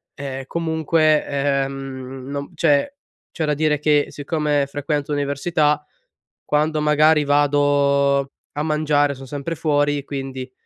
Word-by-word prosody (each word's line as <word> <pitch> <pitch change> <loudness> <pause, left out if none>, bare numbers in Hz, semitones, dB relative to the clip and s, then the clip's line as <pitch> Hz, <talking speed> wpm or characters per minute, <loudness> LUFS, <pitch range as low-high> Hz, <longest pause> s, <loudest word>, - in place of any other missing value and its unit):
ehm, 135 -1 -5
comunque, 160 -1 +1
ehm, 135 -2 -3
non 140 +2 -5
cioè 150 - +2 0.4
c'è 160 - -2
da 150 -1 0
dire 150 0 +1
che 150 -1 +2
siccome 145 -1 -1
frequento 145 +1 -2
l'università, 145 +2 0 0.6
quando, 150 +1 0
magari, 150 +1 +4
vado 140 -1 +2 0.2
a 150 - -2
mangiare, 150 -2 +1
sono 135 0 -11
sempre 145 +4 -4
fuori, 145 -2 +1
quindi 135 -2 -6
145 Hz, 120 wpm, -21 LUFS, 140-150 Hz, 0.6 s, magari